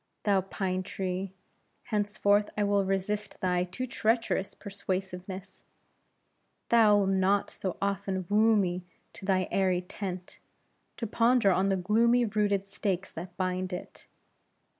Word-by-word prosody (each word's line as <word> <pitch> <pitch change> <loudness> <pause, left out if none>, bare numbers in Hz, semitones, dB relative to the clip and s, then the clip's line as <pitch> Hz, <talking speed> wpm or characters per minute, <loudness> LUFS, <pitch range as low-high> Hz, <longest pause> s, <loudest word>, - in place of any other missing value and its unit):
Thou 200 -2 +3
pine 185 -1 -2
tree! 185 0 -3 0.5
henceforth 205 -1 +1
I 210 - +2
will 200 -1 +2
resist 195 +2 -2
thy 180 -1 +1
too 185 +8 -4
treacherous 230 -4 0
persuasiveness. 190 -1 -5 1.1
Thou'lt 210 -4 +5
not 195 +1 +2
so 185 -2 -4
often 195 -1 -1
woo 220 +3 +4
me 180 -3 0 0.3
to 195 - -10
thy 185 -2 +2
airy 185 -2 +2
tent, 180 -1 -6 0.6
to 230 - -3
ponder 230 -1 +3
on 190 +2 +2
the 195 - +2
gloomy 230 +6 +3
rooted 205 -2 +1
stakes 195 -1 -3
that 175 +2 -8
bind 185 0 -1
it. 180 - -8
195 Hz, 125 wpm, -29 LUFS, 185-210 Hz, 1.1 s, Thou'lt